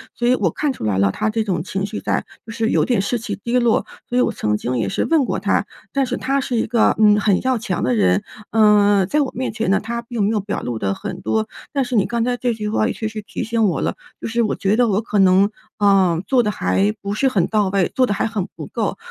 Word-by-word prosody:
所 240 - -1
以 250 - +5
我 190 -8 +1
看 285 - -1
出 - - -9
来 105 -3 0
了， 100 0 +3
她 215 - -1
这 220 0 0
种 180 -6 -1
情 195 +1 -3
绪 205 +2 -5
在， - - -1 0.2
就 225 - -8
是 225 0 -1
有 - - +2
点 240 -6 +1
士 235 +5 -1
气 225 - -4
低 240 +1 +1
落， 235 -2 +2 0.2
所 245 - -1
以 - - +5
我 - - +2
曾 105 0 -1
经 125 +4 -2
也 115 - -1
是 - - -1
问 320 -4 +3
过 - - -2
她。 - - +1 0.3
但 275 -1 +2
是 250 0 -3
她 275 +1 0
是 250 -2 -3
一 225 - +1
个， 235 0 +2
嗯， 210 -1 +5
很 200 -2 +2
要 260 -1 +1
强 220 -6 -3
的 125 - +1
人， 95 -2 +2 0.3
嗯， 205 -3 +4
在 300 +9 +1
我 275 - -1
面 260 - -2
前 220 -3 -2
呢， 195 - +3
她 235 +2 -4
并 235 -3 -3
没 200 - +2
有 220 -1 +1
表 200 +1 -4
露 120 -2 -4
得 100 -2 0
很 - - -6
多。 110 0 0 0.2
但 275 -2 0
是 245 - -3
你 205 - +3
刚 235 -1 -1
才 245 0 0
这 245 -1 0
句 215 -1 -4
话 215 +1 +1
也 - - -2
确 220 - -4
实 215 0 -6
提 215 +1 -5
醒 225 0 +1
我 190 - 0
了， - - -1 0.3
就 - - -3
是 230 +1 0
我 215 - 0
觉 195 +2 +1
得 240 0 +3
我 205 0 +1
可 210 -2 -1
能， 190 +2 +5 0.3
呃， 195 -5 +3
做 260 -2 +4
得 210 - 0
还 95 - +1
不 200 0 -3
是 270 +6 +1
很 195 -10 +2
到 210 -3 +1
位， 195 -2 +1
做 255 - +4
得 205 - 0
还 200 - -1
很 210 -5 -3
不 - - -7
够。 - - -2
215 Hz, 300 characters per minute, -20 LUFS, 190-235 Hz, 0.3 s, 以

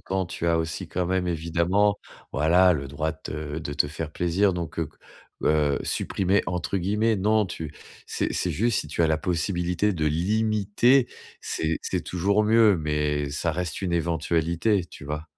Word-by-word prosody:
temps, 95 -1 -2
tu 85 - -4
as 85 -1 +3
aussi 80 0 -3
quand 90 -1 -1
même 95 0 0
évidemment, 85 +5 +1 0.4
voilà, 85 +5 +4
le 70 -2 -4
droit 75 +4 -2
de 80 - -18
te 75 0 -5
de 70 -3 -5
te 75 - +2
faire 75 +1 -6
plaisir, 90 +3 +2
donc, 85 -1 -5
heu 80 -3 -1 0.6
heu 75 -2 +2
«supprimer» 95 +1 0
entre 90 +2 -2
guillemets, 105 +4 +1
non 105 +2 +2
tu 80 -4 -6 0.3
c'est - - -2
c'est 90 - -1
juste 110 +7 +1
si 75 - -8
tu 85 - 0
as - - +4
la 80 0 +2
possibilité 90 +3 0
de 80 - -1
limiter, 110 - +2 0.3
c'est 80 0 -2
c'est - - -2
toujours 100 +4 +1
mieux, 110 -2 +5
mais 75 -2 -1
ça 80 +3 -1
reste 90 0 -3
une 90 -2 -1
éventualité, 85 +3 +1
tu 85 - -12
vois? 75 +1 -4
85 Hz, 175 wpm, -25 LUFS, 80-100 Hz, 0.6 s, mieux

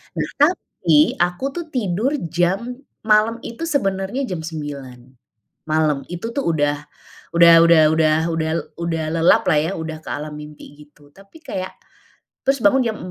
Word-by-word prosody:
Nah, - - -1 0.2
tapi 175 - +2
aku 180 +9 0
tuh 340 +1 -5
tidur 220 +2 0 0.2
jam 190 +9 -1 0.3
malam 220 +2 +3
itu 235 +8 -7
sebenarnya 195 - -1
jam 180 -3 -3
9.00 145 -6 -7 0.7
malam. 155 -3 +1
Itu 200 +7 -5
tuh 280 - -2
udah 145 -2 +1 0.6
udah 170 0 +8
udah 165 -1 +6
udah 155 -1 +3 0.2
udah 160 -1 -1 0.3
udah 165 -2 -2
lelap 165 +1 +4
lah, 150 - +3
ya, 160 +4 -1
udah 160 -1 -5
ke - - -9
alam 150 +1 -5
mimpi, 150 -1 -11
gitu. 145 0 -23
Tapi, 195 +10 -17
kayak 185 -7 -5 0.7
terus 270 0 +1
bangun 265 -1 +4
jam 220 -2 -2
170 Hz, 150 wpm, -20 LUFS, 155-225 Hz, 0.7 s, udah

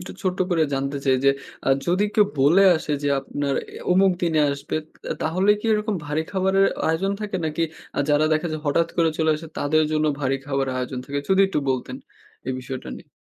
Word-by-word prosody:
একটু 180 - -8
ছোট্ট 185 -1 -1
করে 165 -2 +3
জানতে 140 +1 -2
চাই 130 -1 +3
যে, 140 - +7 0.4
আ - - +3 0.2
যদি 185 +4 +2
কেউ 210 -2 +5
বলে 160 +9 +5
আসে 155 - -4
যে 145 - 0
আপনার 140 0 -3 0.2
এ - - -6
অমুক 190 0 +4
দিনে 160 -3 +2
আসবে, 140 +2 -4 0.3
তা - - -7
তাহলে 185 +6 +2
কি - - -4
এরকম 210 0 0
ভারী 150 +2 -1
খাবারের 190 0 +2 0.2
আয়োজন 180 +5 +1
থাকে? 205 -2 -3
নাকি 155 +1 -1 0.3
আ - - -1
যারা 145 +1 +4
দেখে 155 +2 +1
যায় 155 - -4
হঠাৎ 165 +4 +2
করে 165 -2 +3
চলে 160 -1 +3
আসে 160 +2 -9
তাদের 155 +2 +2
জন্য 155 0 +1
ভারী 135 0 +1
খাবারের 135 -2 -1
আয়োজন 125 0 -3
থাকে? 140 0 -3
যদি 190 0 +4
একটু 190 - -1
বলতেন 130 -1 -3 0.5
এই 130 - -1
বিষয়টা 130 - -7
নিয়ে। - - -15
155 Hz, 210 wpm, -23 LUFS, 140-185 Hz, 0.5 s, যে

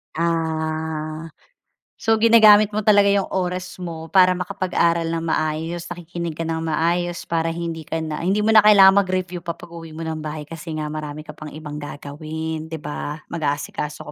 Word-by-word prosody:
Ah. 160 -1 -2 0.7
So 225 -1 +1
ginagamit 215 -2 +7
mo 215 - -1
talaga 205 -1 +5
'yong 200 -1 +1
oras 180 0 -3
mo 165 -2 -7
para 185 -1 +5
makapag-aral 170 -2 0
ng 165 0 -2
maayos, 160 +2 -2
nakikinig 170 -2 -6
ka 165 - -3
ng 160 0 -2
maayos, 170 +2 -1
para 165 0 -1
hindi 165 -2 -5
ka 160 - -2
na 155 -1 -4
hindi 195 +5 +1
mo 220 - +3
na 215 - +9
kailangan 200 -2 +7
mag-review 185 -2 -2
pa 170 -1 -5
'pag 170 0 -13
uwi 165 -2 -9
mo 165 - -5
ng 160 -1 -4
bahay 155 0 -5
kasi 160 +1 -7
nga 150 0 -3
marami 150 0 -6
ka 150 - -9
pang 155 0 -9
ibang 150 0 -7
gagawin, 155 +2 -6
'di 160 - -5
ba? 150 0 -5 0.2
Mag-aasikaso 150 -1 -3
165 Hz, 175 wpm, -22 LUFS, 155-180 Hz, 0.7 s, na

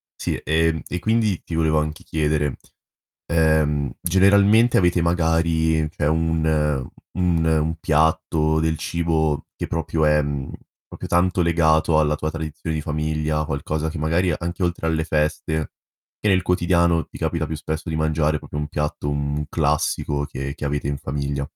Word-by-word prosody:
sì, - - -2
ehm, 80 0 +1
e 90 - -3
quindi 110 -3 +1
ti 85 - -5
volevo 80 -1 +2
anche 75 0 -4
chiedere, 75 -2 -1 0.7
ehm, 80 -4 +2
generalmente 100 +6 +4
avete 90 -2 +2
magari 80 -2 +1
cioè 75 -2 -1
un 80 0 +1 0.7
un 85 -3 +1
un 80 0 +1
piatto, 80 0 +2
del 80 0 0
cibo 80 -3 -1
che - - -3
proprio 80 -1 -1
è 75 0 +4 0.7
proprio - - -8
tanto 90 +1 +2
legato 80 -1 +3
alla 75 -1 +1
tua 75 +1 -2
tradizione 80 0 -5
di 75 - -3
famiglia, 75 0 -1
qualcosa 75 +2 -2
che 80 - -6
magari, 85 +3 +1
anche 85 +2 -5
oltre 85 -2 -1
alle 80 -1 0
feste, 80 0 -1 0.5
che 105 - 0
nel 95 -2 +3
quotidiano 85 -2 +2
ti - - -11
capita 80 -2 -1
più 80 - -4
spesso 80 +2 -5
di 80 - -2
mangiare 80 -1 +1
proprio 75 - -7
un 75 0 -3
piatto, 75 -1 -2
mhmm, 70 +1 -2
classico 75 -2 0
che 70 0 -5
che - - -7
avete 70 0 -2
in 70 -1 -2
famiglia. 70 0 -3
80 Hz, 155 wpm, -22 LUFS, 75-85 Hz, 0.7 s, generalmente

